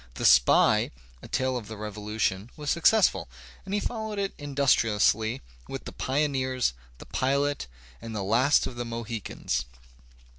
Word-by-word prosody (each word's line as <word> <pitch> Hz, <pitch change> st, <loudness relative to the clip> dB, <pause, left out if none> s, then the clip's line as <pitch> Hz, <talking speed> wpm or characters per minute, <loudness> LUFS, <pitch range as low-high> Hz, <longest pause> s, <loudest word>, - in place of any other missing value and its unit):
"The -, -, -3 dB
Spy," 65 Hz, -1 st, +5 dB, 0.3 s
a -, -, -10 dB
tale 130 Hz, 0 st, 0 dB
of 115 Hz, -4 st, -5 dB
the 110 Hz, 0 st, -8 dB
Revolution, 105 Hz, -1 st, -2 dB
was 150 Hz, -1 st, -2 dB
successful, 185 Hz, -, +3 dB, 0.4 s
and 195 Hz, -, -5 dB
he -, -, +2 dB
followed 220 Hz, -2 st, -4 dB
it 195 Hz, -1 st, -2 dB
industri 140 Hz, -5 st, +2 dB
ously 110 Hz, -, +2 dB, 0.2 s
with -, -, -6 dB
"The -, -, -6 dB
Pioneers," 130 Hz, -, 0 dB, 0.2 s
"The -, -, -11 dB
Pilot," 140 Hz, -, 0 dB, 0.3 s
"The 110 Hz, -3 st, -4 dB
Last 120 Hz, +9 st, +3 dB
of 120 Hz, -, -6 dB
the 120 Hz, -, -3 dB
Mohicans." 115 Hz, -2 st, -3 dB
125 Hz, 145 wpm, -27 LUFS, 110-145 Hz, 0.4 s, Spy